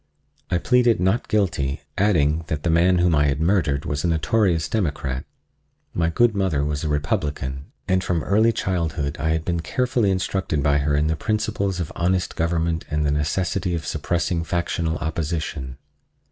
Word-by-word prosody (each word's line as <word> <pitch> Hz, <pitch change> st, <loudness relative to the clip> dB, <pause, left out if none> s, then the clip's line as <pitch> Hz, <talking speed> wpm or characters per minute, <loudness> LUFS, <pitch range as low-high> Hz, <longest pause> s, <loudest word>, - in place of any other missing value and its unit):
I 90 Hz, -, +2 dB
pleaded 120 Hz, +3 st, +3 dB
not 95 Hz, +7 st, +1 dB
guilty, 85 Hz, -10 st, 0 dB
adding 80 Hz, -6 st, +2 dB
that 75 Hz, -2 st, -3 dB
the 85 Hz, -, +1 dB
man 90 Hz, +2 st, +4 dB
whom 90 Hz, -1 st, +3 dB
I 75 Hz, -1 st, +3 dB
had 70 Hz, 0 st, 0 dB
murdered 80 Hz, -5 st, +1 dB
was 75 Hz, 0 st, -2 dB
a -, -, +1 dB
notorious 85 Hz, 0 st, +1 dB
Democrat. 70 Hz, -, -2 dB, 0.7 s
(My 85 Hz, -1 st, +1 dB
good 120 Hz, +7 st, +3 dB
mother 95 Hz, -8 st, 0 dB
was 75 Hz, 0 st, -2 dB
a 80 Hz, -, -1 dB
Republican, 70 Hz, -2 st, -2 dB, 0.2 s
and 95 Hz, 0 st, +2 dB
from 85 Hz, -3 st, -1 dB
early 110 Hz, +3 st, +3 dB
childhood 85 Hz, -8 st, -2 dB
I 80 Hz, +2 st, 0 dB
had 80 Hz, 0 st, 0 dB
been 85 Hz, -1 st, 0 dB
carefully 125 Hz, +3 st, 0 dB
instructed 95 Hz, -5 st, -1 dB
by 70 Hz, 0 st, +3 dB
her 70 Hz, +1 st, +1 dB
in 75 Hz, +1 st, +2 dB
the 80 Hz, +1 st, +1 dB
principles 100 Hz, -1 st, -1 dB
of 85 Hz, -2 st, -3 dB
honest 90 Hz, +1 st, 0 dB
government 85 Hz, 0 st, 0 dB
and 75 Hz, 0 st, 0 dB
the 70 Hz, -, +2 dB
necessity 90 Hz, +5 st, -1 dB
of 80 Hz, -2 st, -4 dB
suppressing 85 Hz, +2 st, -1 dB
factional 85 Hz, -1 st, -1 dB
opposition.) 75 Hz, -4 st, -3 dB
85 Hz, 170 wpm, -23 LUFS, 75-95 Hz, 0.7 s, man